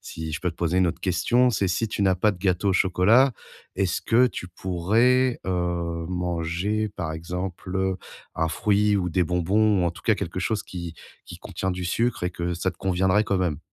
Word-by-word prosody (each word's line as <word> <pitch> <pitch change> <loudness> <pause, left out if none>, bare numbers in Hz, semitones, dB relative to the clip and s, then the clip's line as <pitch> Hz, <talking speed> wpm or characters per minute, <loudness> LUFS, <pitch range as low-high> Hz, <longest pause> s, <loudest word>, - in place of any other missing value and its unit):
si 80 -1 -7
je 75 - -3
peux 90 - -1
te - - -26
poser 85 +2 0
une 90 - +4
autre 85 - -5
question, 110 +8 +2
c'est 100 -4 0
si 110 +5 0
tu 105 - -2
n'as 95 -1 +4
pas 105 +4 +3
de 95 - -12
gâteau 95 +1 +1
au - - +2
chocolat, 100 +8 +4 0.4
est-ce 95 -3 0
que 120 +2 +4
tu 90 - -6
pourrais, 115 +9 +1
heu, 85 -2 -2
manger, 90 +4 -1
par 80 - -3
exemple, 90 +3 -3 0.4
un 80 - +1
fruit 105 +4 +2
ou 90 -2 -1
des 90 +1 +2
bonbons? 95 +4 +2
Ou 85 - +2
en - - +1
tout - - -14
cas, - - +3
quelque 85 +2 -5
chose 105 +2 -1
qui 85 -2 -7 0.3
qui - - -9
contient 95 0 -3
du 90 0 -4
sucre, 115 +6 0
et 90 - 0
que 85 0 -3
ça 90 +2 -1
te 90 - -16
conviendrait 95 +2 +2
quand 100 - 0
même? 85 -5 -1
90 Hz, 210 wpm, -25 LUFS, 85-105 Hz, 0.4 s, une